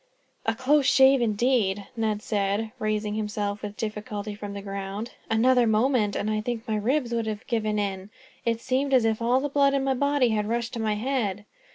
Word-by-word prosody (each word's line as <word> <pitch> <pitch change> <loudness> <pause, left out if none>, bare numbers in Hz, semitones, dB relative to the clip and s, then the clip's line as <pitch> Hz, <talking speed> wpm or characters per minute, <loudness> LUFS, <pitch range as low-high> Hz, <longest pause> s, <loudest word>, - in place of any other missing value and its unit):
"A - - +2
close 280 +1 +3
shave, 265 -1 +6
indeed," 215 -3 +1
Ned 215 -2 -1
said, 205 +1 -1
raising 215 -1 -1
himself 210 -1 -3
with 210 0 -6
difficulty 210 -1 -4
from 205 -1 -7
the 200 - -5
ground. 200 +3 -5 0.2
"Another 245 +2 +4
moment, 220 -1 +2
and 205 - -2
I 215 0 0
think 230 0 -4
my 220 - 0
ribs 240 +3 0
would 230 -1 -1
have 215 -1 -4
given 215 -2 -1
in. 195 -1 -3 0.3
It 230 -1 0
seemed 265 +2 +1
as 245 -3 +4
if 220 0 0
all 245 +3 +3
the 285 - -1
blood 280 -1 +3
in 275 - +1
my 270 0 +1
body 280 -1 +2
had 210 -1 0
rushed 235 0 -2
to 235 - -4
my 215 -1 0
head." 210 -4 -2
220 Hz, 200 wpm, -26 LUFS, 210-250 Hz, 0.3 s, shave